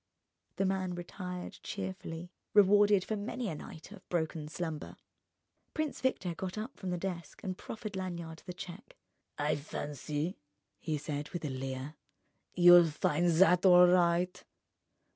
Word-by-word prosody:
The 195 Hz, -, +1 dB
man 185 Hz, -1 st, -1 dB
retired 180 Hz, +1 st, -6 dB
cheerfully, 185 Hz, -3 st, -5 dB, 0.2 s
rewarded 205 Hz, -1 st, +6 dB
for 215 Hz, -, -2 dB
many 230 Hz, +2 st, -3 dB
a -, -, -3 dB
night 155 Hz, +3 st, -10 dB
of 205 Hz, -3 st, -13 dB
broken 160 Hz, -3 st, -1 dB
slumber. 160 Hz, -1 st, -5 dB, 0.8 s
Prince 310 Hz, -2 st, -2 dB
Victor 190 Hz, -9 st, 0 dB
got 185 Hz, +4 st, -5 dB
up 225 Hz, +6 st, -5 dB
from 190 Hz, -, -5 dB
the 180 Hz, -, -1 dB
desk 175 Hz, -3 st, -5 dB
and 185 Hz, -1 st, -3 dB
proffered 215 Hz, +1 st, -7 dB
Lanyard 170 Hz, -4 st, -5 dB
the 180 Hz, -, -4 dB
cheque. 200 Hz, -, -10 dB, 0.4 s
"I 150 Hz, +1 st, +1 dB
fancy," 150 Hz, +3 st, -4 dB, 0.4 s
he 155 Hz, -3 st, -2 dB
said 150 Hz, 0 st, -4 dB
with 175 Hz, -3 st, -5 dB
a 145 Hz, -, -2 dB
leer, 130 Hz, +2 st, -5 dB, 0.6 s
"you'll 175 Hz, -1 st, +8 dB
find 155 Hz, +3 st, +1 dB
that 180 Hz, +1 st, +5 dB
all 180 Hz, -2 st, +8 dB
right." 175 Hz, 0 st, +3 dB
180 Hz, 140 wpm, -32 LUFS, 160-190 Hz, 0.8 s, you'll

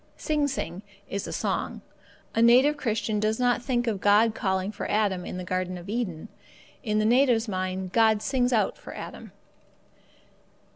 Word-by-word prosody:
Sing 300 Hz, -2 st, 0 dB
sing 190 Hz, -, -4 dB, 0.3 s
is 200 Hz, 0 st, -4 dB
a -, -, -5 dB
song. -, -, -2 dB, 0.5 s
The 225 Hz, -, +1 dB
native 255 Hz, +6 st, +6 dB
Christian 220 Hz, -4 st, -1 dB
does 215 Hz, +2 st, 0 dB
not 245 Hz, -1 st, +2 dB
think 245 Hz, -1 st, 0 dB
of 210 Hz, -5 st, -2 dB
God 210 Hz, +2 st, +4 dB
calling 190 Hz, -1 st, -1 dB
for 210 Hz, -, -5 dB
Adam 200 Hz, -4 st, 0 dB
in -, -, -5 dB
the 180 Hz, -, -5 dB
Garden 185 Hz, 0 st, -2 dB
of 175 Hz, +2 st, -10 dB
Eden; 210 Hz, -6 st, -3 dB, 0.5 s
in 215 Hz, -3 st, -1 dB
the 215 Hz, -, +2 dB
native's 240 Hz, -1 st, +3 dB
mind, 185 Hz, -1 st, -3 dB
God 220 Hz, -2 st, +3 dB
sings 255 Hz, -2 st, +1 dB
out 225 Hz, -3 st, +1 dB
for -, -, -10 dB
Adam. -, -, -9 dB
215 Hz, 165 wpm, -26 LUFS, 190-240 Hz, 0.5 s, native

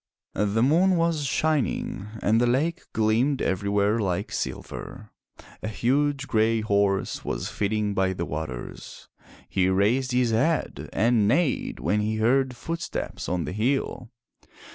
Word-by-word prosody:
The 105 Hz, +2 st, +1 dB
moon 175 Hz, +8 st, +4 dB
was 165 Hz, -3 st, +1 dB
shining 140 Hz, -9 st, 0 dB, 0.2 s
and 110 Hz, +3 st, +3 dB
the 120 Hz, -, +3 dB
lake 155 Hz, +8 st, 0 dB
gleamed 115 Hz, +6 st, +2 dB
everywhere 100 Hz, +3 st, +1 dB
like 90 Hz, -5 st, -1 dB
silver. -, -, -6 dB, 0.5 s
A -, -, -4 dB
huge 135 Hz, +5 st, 0 dB
gray 110 Hz, 0 st, +2 dB
horse 100 Hz, -2 st, 0 dB
was -, -, -3 dB
feeding 105 Hz, 0 st, -1 dB
by 95 Hz, -1 st, +1 dB
the 85 Hz, -2 st, -3 dB
waters. 75 Hz, -7 st, -7 dB, 0.4 s
He 95 Hz, -1 st, +1 dB
raised 110 Hz, +8 st, +2 dB
his 125 Hz, -1 st, +2 dB
head 155 Hz, +9 st, 0 dB
and 115 Hz, -2 st, +3 dB
neighed 145 Hz, -, +1 dB
when 85 Hz, +11 st, +1 dB
he 105 Hz, +1 st, -1 dB
heard 125 Hz, +4 st, +2 dB
footsteps 165 Hz, +7 st, -4 dB
on 90 Hz, -1 st, -1 dB
the -, -, -4 dB
hill. 120 Hz, +2 st, -1 dB
110 Hz, 135 wpm, -25 LUFS, 100-135 Hz, 0.5 s, moon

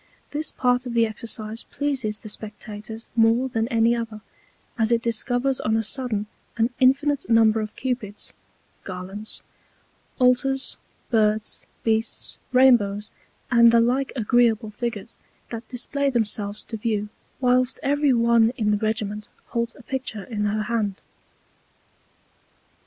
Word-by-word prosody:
This 305 Hz, +2 st, -3 dB
part 250 Hz, 0 st, +1 dB
of 240 Hz, -, -5 dB
the 230 Hz, -1 st, +5 dB
Exercise 220 Hz, 0 st, -1 dB
pleases 260 Hz, -7 st, -2 dB
the 215 Hz, -, -8 dB
Spectators 215 Hz, +1 st, -7 dB
more 230 Hz, +3 st, +4 dB
than 225 Hz, -2 st, 0 dB
any 230 Hz, 0 st, +3 dB
other, 225 Hz, -2 st, -5 dB, 0.5 s
as 225 Hz, 0 st, +1 dB
it 230 Hz, -1 st, +2 dB
discovers 245 Hz, +3 st, 0 dB
on 220 Hz, +1 st, +1 dB
a 225 Hz, -, 0 dB
sudden 225 Hz, -3 st, -1 dB, 0.3 s
an 230 Hz, +2 st, +2 dB
infinite 275 Hz, +1 st, +3 dB
Number 225 Hz, -1 st, +5 dB
of 215 Hz, 0 st, -6 dB
Cupids, 240 Hz, -6 st, -4 dB, 0.5 s
[Garlands,] 190 Hz, +3 st, -7 dB, 0.7 s
Altars, 260 Hz, +2 st, +2 dB, 0.3 s
Birds, 215 Hz, -2 st, +1 dB, 0.2 s
Beasts, 225 Hz, 0 st, -1 dB
Rainbows, 225 Hz, -6 st, +4 dB, 0.4 s
and 235 Hz, -1 st, +7 dB
the 235 Hz, -, +5 dB
like 255 Hz, +4 st, +1 dB
agreeable 230 Hz, -2 st, +2 dB
Figures, 230 Hz, 0 st, -5 dB, 0.3 s
that 230 Hz, -1 st, -6 dB
display 280 Hz, +3 st, -2 dB
themselves 210 Hz, -4 st, 0 dB
to 225 Hz, -, -6 dB
View, 210 Hz, -1 st, -1 dB, 0.3 s
whilst 255 Hz, 0 st, +3 dB
every 285 Hz, 0 st, +3 dB
one 235 Hz, -2 st, +4 dB
in 210 Hz, -3 st, +1 dB
the 210 Hz, -, +2 dB
Regiment 210 Hz, -1 st, -2 dB, 0.2 s
holds 235 Hz, -1 st, -2 dB
a 270 Hz, -, -15 dB
Picture 255 Hz, -5 st, -4 dB
in 210 Hz, -2 st, -3 dB
her 215 Hz, +1 st, 0 dB
Hand. 215 Hz, -3 st, -1 dB
230 Hz, 130 wpm, -24 LUFS, 215-250 Hz, 0.7 s, and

